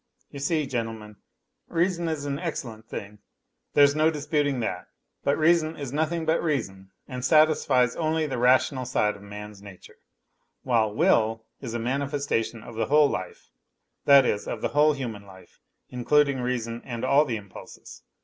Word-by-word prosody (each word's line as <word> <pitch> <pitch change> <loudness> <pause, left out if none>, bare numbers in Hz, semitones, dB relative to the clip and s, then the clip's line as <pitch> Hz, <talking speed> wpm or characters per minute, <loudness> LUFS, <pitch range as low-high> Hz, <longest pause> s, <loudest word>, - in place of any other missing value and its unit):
You 140 - -8
see, 150 +2 0
gentlemen, 115 -4 -5 0.5
reason 170 0 0
is 155 -3 -3
an 140 0 -3
excellent 120 -10 -5
thing, 100 +1 -7 0.6
there's 145 -1 +6
no 155 +1 +3
disputing 150 -3 -1
that, 110 - -4 0.4
but 140 - +1
reason 160 0 +2
is 140 -3 -6
nothing 160 +2 -1
but 160 +1 +1
reason 100 - -3 0.2
and 125 -2 -6
satisfies 140 -4 +3
only 160 -1 0
the 135 -5 -3
rational 130 +1 +3
side 105 -4 0
of 100 - -14
man's 105 0 -10
nature, 100 -3 -14 0.6
while 115 -4 +2
will 110 +1 +2 0.2
is 120 -4 -5
a - - -1
manifestation 130 -3 -2
of 120 - -10
the 115 - -2
whole 150 0 +5
life, - - -6 0.5
that 140 -2 +7
is, 105 -3 -1
of - - -4
the - - +1
whole 150 +1 +4
human 115 -7 -6
I'L 95 -1 -14 0.4
including 140 +2 +2
reason 120 -2 -3
and 120 -1 -5
all 140 +3 +5
the 120 -7 -3
impulses. 100 -2 -12
130 Hz, 160 wpm, -26 LUFS, 115-150 Hz, 0.6 s, that